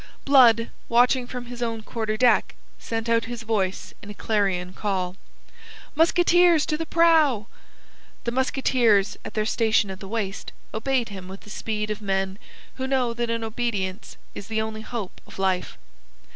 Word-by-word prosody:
Blood, 235 -5 +5 0.2
watching 245 +1 +3
from 245 -1 -6
his 245 0 -9
own 230 -2 -2
quarter 220 -1 -3
deck, 245 +1 +3 0.2
sent 225 0 -4
out 230 0 +2
his 235 0 -6
voice 200 -4 -2
in 205 - -11
a 205 - -8
clarion 190 -5 0
call: 185 -3 -2 0.8
"Musketeers 345 0 +4
to 310 - -1
the 325 +1 -4
prow!" 315 -10 +4 0.8
The 235 - -1
musketeers, 245 -5 +2
at - - -8
their 215 -1 +1
station 220 -3 +2
at 190 - -8
the 195 - -8
waist, 200 -2 -4 0.2
obeyed 245 +1 0
him 190 -2 -8
with 190 +1 -9
the 210 - -13
speed 215 -1 -3
of 210 - -4
men 195 -1 -1 0.4
who 260 0 -2
know 255 -3 +1
that 235 0 -2
in 230 0 -1
obedience 220 -5 -3 0.2
is 200 - -8
the 220 0 -1
only 220 0 -3
hope 220 -4 -6
of - - -13
life. 190 -1 -1
225 Hz, 165 wpm, -24 LUFS, 205-245 Hz, 0.8 s, Blood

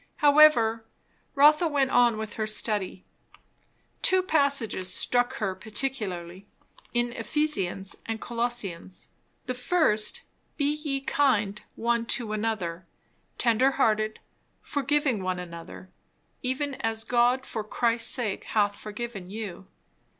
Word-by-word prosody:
However, 285 -7 +5 0.5
Rotha 300 +4 +6
went 280 -3 +1
on 240 -2 +4
with 220 -1 -5
her 215 -1 -2
study. 210 -3 -1 1.0
Two 375 0 +4
passages 275 - +1
struck 245 +1 0
her 195 -4 -2
particularly, 195 -4 -4 0.4
in 240 0 0
Ephesians 220 -7 -1
and 225 0 -3
Colossians. 230 -8 -3 0.4
The 255 - -2
first 250 -5 +1 0.3
"Be 290 -1 +1
ye 295 -3 -3
kind 215 -8 +1
one 235 0 0
to 225 -4 -5
another, 210 -5 -3 0.5
tender 250 +3 +3
hearted, 215 -4 +1 0.4
forgiving 285 -5 0
one 185 -1 -2
another, 175 +1 -9 0.5
even 270 +3 -1
as 225 0 0
God 245 +2 +2
for 220 - -4
Christ's 230 +1 +1
sake 230 -7 0
hath 205 -2 +1
forgiven 210 -3 -7
you." 200 -3 -7
230 Hz, 115 wpm, -27 LUFS, 205-270 Hz, 1.0 s, Rotha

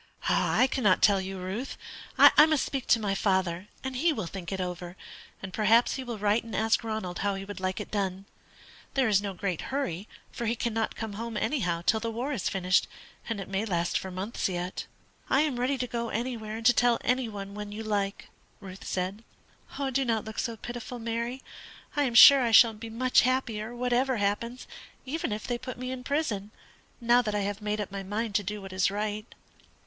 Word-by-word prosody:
"I 255 - +3
cannot 240 -8 +2
tell 200 -2 +5
you, 190 0 -5
Ruth. 190 +8 -5 0.4
I 300 - +8
must 310 -3 +2
speak 270 -3 -4
to 230 - +5
my 205 -2 -1
father, 190 -2 0 0.2
and 265 0 -4
he 325 +7 +3
will 280 - -3
think 175 0 -7
it 190 - -3
over, 180 0 -5 0.5
and 190 -1 -6
perhaps 225 +2 +4
he 265 - -4
will 240 -3 -5
write 210 +2 +2
and 230 - -7
ask 220 +1 +2
Ronald 215 -5 -4
how 200 0 0
he 195 0 -6
would 205 0 -7
like 185 0 -2
it - - -7
done. 195 -2 -2 0.7
There 265 -3 +3
is 205 -2 +3
no 200 -2 -4
great 185 -3 -2
hurry, 210 -9 -2 0.2
for 235 - -4
he 230 - +1
cannot 225 -1 -1
come 220 -2 -5
home 225 +1 -5
anyhow 175 - -1
till 220 - +3
the 230 +1 -3
war 240 +6 -3
is 215 -9 -1
finished, 185 0 +2 0.4
and 225 -3 -2
it 195 - -6
may 195 +1 -1
last 175 -5 -1
for 190 - -1
months 190 +4 -3
yet." 180 0 -4 0.4
"Well, - - +3
I - - +5
am 280 -6 -1
ready 260 +3 +1
to 250 - -1
go 235 -1 -3
anywhere 225 -2 -3
and 225 - -8
to 245 - +7
tell 240 0 +3
every 250 -1 +1
one 200 -2 -7
when 210 0 -6
you 215 +2 -6
like," 205 -2 -2 0.3
Ruth 190 -2 -10
said. 190 +4 -3 0.7
"Do 270 +1 +1
not 225 -4 0
look 220 0 -6
so 230 -2 -2
pitiful, 240 +2 -6
Mary. 235 +3 -3 0.5
I 290 -1 +2
am 240 -3 -2
sure 275 +3 +10
I 240 - +2
shall 230 0 +7
be 225 +1 -8
much 250 +3 +3
happier, 240 -3 -1
whatever 250 +1 +1
happens, 220 +5 -2 0.4
even 320 +1 -2
if 210 +1 -4
they 240 -1 -2
put 255 0 -7
me 255 +1 -4
in 255 -1 -6
prison, 245 -9 -1 0.5
now 240 0 +4
that 210 -3 -2
I 205 - +1
have 200 +1 -3
made 210 0 -2
up 205 - -4
my 195 0 -4
mind 210 +3 -3
to 205 0 +1
do 205 +1 -5
what 195 -1 -8
is 190 +1 +2
right." 210 +1 -3
220 Hz, 215 wpm, -28 LUFS, 195-245 Hz, 0.7 s, sure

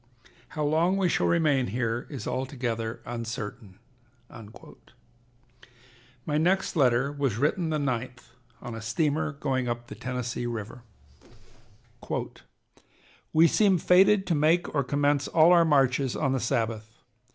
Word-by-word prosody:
How 150 - 0
long 165 +6 +2
we 190 -2 +2
shall - - +1
remain 150 -6 +2
here 115 +2 -2
is 140 -4 -7
altogether 120 -4 -3
uncertain." 115 -4 -6 2.5
My 150 0 0
next 185 +4 +1
letter 135 -2 +2
was 140 -7 -2
written 160 +6 0
the 155 - 0
9th 125 -3 -3 0.4
on 120 -2 -6
a 115 - -7
steamer 150 +7 -1
going 130 -3 -2
up 120 0 -3
the - - -7
Tennessee 125 -1 -4
River: 115 0 -6 2.5
"We 160 +1 +5
seem 195 0 +3
fated 190 +4 +4
to 180 - 0
make 160 +4 +1
or 140 -2 +1
commence 145 +1 0
all 165 +1 +5
our 170 -1 +6
marches 135 -3 +2
on 135 -3 0
the 135 - 0
Sabbath. 115 -3 -3
135 Hz, 130 wpm, -27 LUFS, 120-155 Hz, 2.5 s, our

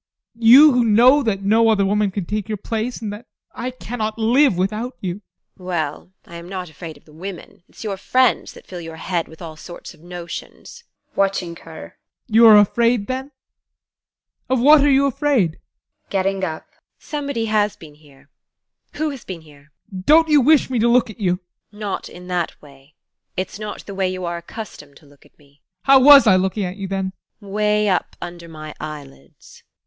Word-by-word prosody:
You 260 +7 +8
who 245 -2 +2
know 240 +6 +5
that 205 -6 -2
no 225 +3 +4
other 200 -3 +3
woman 205 +1 +1
can 190 -1 -4
take 210 +1 -3
your 215 - -2
place, 225 +4 -4
and 205 -1 -4
that 220 +4 -11 0.3
I 245 +2 -4
cannot 230 -3 -5
live 235 0 +3
without 215 +7 -2
you! 185 +1 -5 0.4
TEKLA. 185 - -16
Well, 170 -1 -3
I 170 - -10
am 170 +1 -10
not 185 -3 -6
afraid 160 +1 -9
of - - -24
the 150 - -19
women 180 +2 -9
it's - - -12
your 200 -3 -3
friends 255 +5 +1
that - - -15
fill 180 -2 -8
your 165 -1 -8
head 170 +1 -3
with 160 +2 -13
all 160 -2 -8
sorts 175 +3 -11
of - - -21
notions. 175 - -9 0.3
ADOLPH. - - -32
[Watching 195 -3 0
her] 160 -2 -12 0.3
You 230 0 +6
are 215 -1 +9
afraid 230 +2 +3
then? 260 +3 -4 1.2
Of 260 -1 +2
what 290 +3 +6
are 290 - +4
you 275 0 +4
afraid? 275 - +1
TEKLA. - - -30
[Getting 195 0 -1
up] 160 -3 -6 0.3
Somebody 280 -6 -4
has 215 -2 +1
been 155 -3 -14
here. 145 -2 -22 0.6
Who 310 0 -2
has 270 -3 -9
been 180 -3 -8
here? 150 -1 -19 0.2
ADOLPH. 185 -1 -8
Don't 320 +2 +6
you 295 -2 +5
wish 300 +3 +4
me 250 - 0
to 230 - +3
look 235 -1 +3
at 215 - -16
you? 185 -4 +1 0.4
TEKLA. - - -16
Not 205 -2 -4
in 180 0 -12
that 180 -2 -3
way: 140 0 -19 0.4
it's 185 +2 -4
not 210 -1 -7
the 200 - -8
way 190 -1 0
you 185 -1 -5
are 170 0 -3
accustomed 170 -6 -10
to - - -21
look 145 0 -21
at - - -37
me. 140 -1 -26 0.2
ADOLPH. - - -39
How 270 0 +7
was 280 0 +9
I 190 -4 +5
looking 190 +2 -1
at 180 +2 -6
you 195 -1 -5
then? 190 0 -3 0.3
TEKLA. 205 - -15
Way 210 0 +1
up 185 -3 -1
under 175 -1 -8
my 155 -1 -9
eyelids. 140 - -11
195 Hz, 205 wpm, -20 LUFS, 170-235 Hz, 1.2 s, are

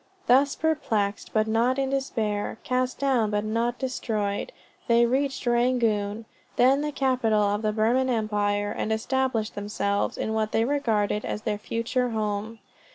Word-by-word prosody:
Thus 275 +3 +4
"perplexed 220 -11 -1
but 215 -1 +2
not 230 +4 +1
in 270 -1 0
despair, 225 -7 -2
cast 255 0 -1
down 255 -6 +1
but 210 0 0
not 230 +3 -1
destroyed," 220 - -2 0.4
they 235 0 +5
reached 270 +3 -1
Rangoon, 230 -3 +1 0.3
then 265 +3 +4
the 300 0 -2
capital 250 -6 +1
of 205 +1 0
the 215 -1 0
Burman 235 +5 +2
Empire, 205 -3 0
and 215 - -3
established 225 0 0
themselves 205 0 -1
in 220 - -2
what 220 -1 -1
they 225 - +2
regarded 220 -7 0
as 210 - -4
their 210 -2 -2
future 235 +3 -1
home. 215 0 -3
225 Hz, 150 wpm, -26 LUFS, 210-255 Hz, 0.4 s, they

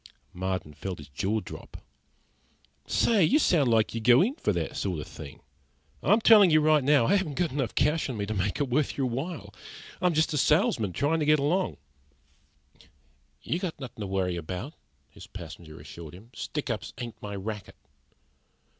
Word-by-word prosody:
Marden 95 -4 -3
felt 90 +4 -5
his 75 -1 -12
jaw 100 +10 -1
drop. - - -10 1.1
"Say, 215 -5 +3
you 260 - +4
sound, 160 - +3
like 110 -2 +2
you 115 - -3
go 120 +6 +6
in 240 +7 0
for 315 - -1
that - - -3
sort - - -2
of - - -6
thing! - - -11 0.6
I'm 220 - +3
telling 210 -4 +8
you 155 -1 +5
right 155 -1 +4
now, 140 -3 +4
I 200 - +4
haven't 165 -7 -3
enough 140 -8 -1
cash 150 +1 +1
on 125 - -4
me 100 - -2
to 110 - -3
make 100 +4 -1
it 145 - +1
worth 135 +3 0
your 135 - +1
while. 135 +8 -4 0.5
I'm 180 -3 +2
just 155 0 +2
a 150 - +1
salesman, 105 -6 +2
trying 155 - +1
to 150 - 0
get 155 0 +6
along." 165 +7 0 1.7
"You 170 - -1
got 180 -4 -4
nothin' 125 -5 -8
to 100 - -3
worry 95 -2 -1
about," 90 - -5 0.4
his - - -13
passenger 80 -2 -10
assured 80 +2 -10
him. 110 +6 -15
"Stick 145 +3 -4
ups 110 - -5
ain't 120 -1 -7
my 100 -1 -5
racket." 105 +1 -6
125 Hz, 180 wpm, -27 LUFS, 100-155 Hz, 1.7 s, telling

